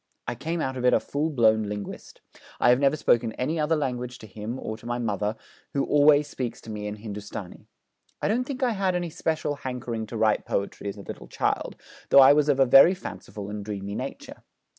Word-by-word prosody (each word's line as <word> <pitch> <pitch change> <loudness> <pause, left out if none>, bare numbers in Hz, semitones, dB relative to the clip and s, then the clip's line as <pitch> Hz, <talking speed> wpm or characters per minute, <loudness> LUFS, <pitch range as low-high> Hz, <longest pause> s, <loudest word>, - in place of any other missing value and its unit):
I - - -1
came 160 +7 -3
out 130 -2 -2
of 125 - -4
it 125 - +5
a - - +4
full 150 +3 -2
blown 110 -6 +3
linguist. 105 -1 -7 0.4
I - - +4
have 125 +1 +5
never 140 +1 +3
spoken 115 -5 +2
any 155 +6 -2
other 155 +2 +2
language 125 -4 -3
to - - -12
him, 110 +4 -6
or 110 - -4
to 115 - -12
my 120 0 -1
mother, 105 -2 -1 0.4
who 140 - +1
always 145 0 +5
speaks 125 -5 -5
to 110 - -9
me 105 -1 -5
in 105 - -4
Hindustani. 105 -3 -8 0.5
I - - -1
don't 240 +4 +1
think 265 -1 -4
I 250 - +3
had 190 -4 0
any 175 -2 -2
special 155 -2 -2
hankering 125 -4 -4
to 115 - -6
write 110 -1 +2
poetry 100 +1 -3
as 100 - -7
a - - -8
little - - -8
child, - - -1 0.3
though - - +5
I 135 +1 +9
was 150 0 +2
of 140 -2 +3
a 135 - +6
very 135 +8 +7
fanciful 105 - -8
and 105 -1 -5
dreamy 100 -1 -5
nature. - - -7
125 Hz, 220 wpm, -26 LUFS, 110-150 Hz, 0.5 s, I